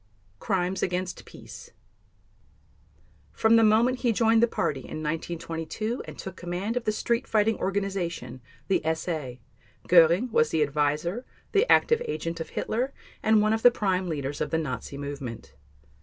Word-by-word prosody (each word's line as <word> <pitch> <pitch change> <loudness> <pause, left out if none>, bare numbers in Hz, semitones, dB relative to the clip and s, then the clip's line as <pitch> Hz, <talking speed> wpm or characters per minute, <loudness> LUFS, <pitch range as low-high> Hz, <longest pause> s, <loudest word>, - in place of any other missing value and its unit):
Crimes 185 -1 -1
against 180 0 -2
Peace - - -12 1.6
From 220 +1 +4
the 225 - +6
moment 230 +4 +4
he 240 - +2
joined 225 0 +3
the 235 - +5
Party 145 - -1
in 155 +4 -7
1922 165 +8 -3
and - - -10
took 190 -2 -7
command 180 +6 -3
of 245 - -2
the 215 - +2
street 235 +4 -1
fighting 220 0 +2
organization, 185 -10 -3 0.3
the 195 - +2
SA, 155 -6 -4 0.5
Göring 175 +7 +5
was 155 -7 +3
the 160 -1 +2
adviser, 150 - -1 0.3
the 435 +4 +3
active 465 0 +4
agent 165 - -3
of 160 - -5
Hitler, 250 +5 -2 0.3
and 215 -1 +4
one 215 +1 +2
of 220 - -1
the 245 - +8
prime 190 -5 -1
leaders 145 -2 -3
of - - -1
the 160 - 0
Nazi 140 -3 -4
movement. 140 -4 -7
185 Hz, 155 wpm, -27 LUFS, 155-220 Hz, 1.6 s, the